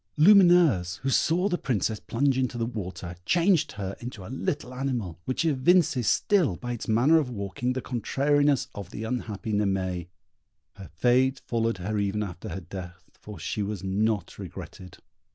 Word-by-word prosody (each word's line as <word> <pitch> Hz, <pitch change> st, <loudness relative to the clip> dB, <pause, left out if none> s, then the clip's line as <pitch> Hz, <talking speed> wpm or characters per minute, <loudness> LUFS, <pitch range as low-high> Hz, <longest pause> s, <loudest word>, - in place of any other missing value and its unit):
Lumineuse, 170 Hz, -, +5 dB
who 135 Hz, -, -1 dB
saw 175 Hz, +8 st, +2 dB
the 175 Hz, -3 st, -1 dB
Princess 110 Hz, -3 st, -1 dB
plunge 135 Hz, +3 st, 0 dB
into 130 Hz, -2 st, -1 dB
the 115 Hz, -, 0 dB
water, 95 Hz, -6 st, -6 dB
changed 170 Hz, -, +2 dB
her 100 Hz, -2 st, -5 dB
into 115 Hz, -6 st, -8 dB
a 115 Hz, -, -7 dB
little 135 Hz, -1 st, -3 dB
animal, 125 Hz, -10 st, -3 dB
which 130 Hz, +6 st, -1 dB
evinces 145 Hz, -, +3 dB
still, 180 Hz, -, +2 dB
by 120 Hz, +7 st, -6 dB
its 120 Hz, -, -6 dB
manner 125 Hz, +9 st, +4 dB
of 140 Hz, -5 st, -2 dB
walking, 115 Hz, +3 st, -3 dB
the 130 Hz, -, -4 dB
contrariness 140 Hz, +3 st, +1 dB
of 100 Hz, -3 st, -7 dB
the 110 Hz, -, -6 dB
unhappy 110 Hz, -2 st, -4 dB
Naimée. 95 Hz, -4 st, -1 dB, 0.7 s
Her 95 Hz, -, -11 dB
fate 125 Hz, -, +2 dB
followed 115 Hz, -2 st, 0 dB
her 105 Hz, +4 st, -2 dB
even 100 Hz, +1 st, -1 dB
after 90 Hz, -3 st, -7 dB
death, 90 Hz, -1 st, -9 dB
for 105 Hz, -2 st, -11 dB
she 95 Hz, +6 st, -3 dB
was 100 Hz, -2 st, -4 dB
not 100 Hz, 0 st, -1 dB
regretted. 90 Hz, -2 st, -9 dB
115 Hz, 160 wpm, -27 LUFS, 100-135 Hz, 0.7 s, Lumineuse